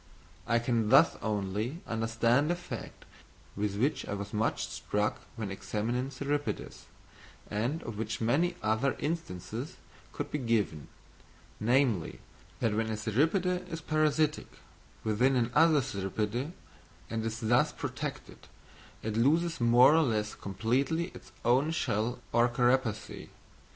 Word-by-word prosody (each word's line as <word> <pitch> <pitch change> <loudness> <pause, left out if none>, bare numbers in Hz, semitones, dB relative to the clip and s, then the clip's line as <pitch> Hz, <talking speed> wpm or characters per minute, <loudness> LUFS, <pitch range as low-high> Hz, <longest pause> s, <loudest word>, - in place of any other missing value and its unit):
I 115 - +3
can 115 -2 +1
thus 135 +6 +6
only 105 - -2
understand 115 +5 +1
a 175 - +2
fact 130 - -8 0.5
with 100 0 -1
which 130 +9 +1
I 100 - -2
was 100 0 -6
much 110 +1 0
struck 105 +1 -2
when 110 -4 -4
examining 120 +6 -2
cirripedes, 145 +2 -3 0.7
and 120 +10 -1
of 110 -3 -6
which 115 0 -3
many 155 +10 +2
other 110 +5 +1
instances 145 - -4 0.3
could - - -5
be 150 - -1
given: 110 - 0 0.7
namely, 120 - +2 0.4
that 115 - +2
when 110 +1 0
a 110 - -2
cirripede 175 - +1
is 165 - -3
parasitic 155 0 +1 0.6
within 125 +5 +2
another 140 +6 +4
cirripede 105 - -2 0.6
and 115 -1 -1
is 115 0 -3
thus 120 +1 +3
protected, - - -6 0.6
it 110 -1 -2
loses 160 +7 +2
more 120 +4 +7
or 165 - +5
less 110 -6 0
completely 130 - -1
its - - -13
own 130 +6 +4
shell 120 -6 -1 0.2
or 120 +1 +4
carapace. 120 -2 0
120 Hz, 125 wpm, -30 LUFS, 110-145 Hz, 0.7 s, more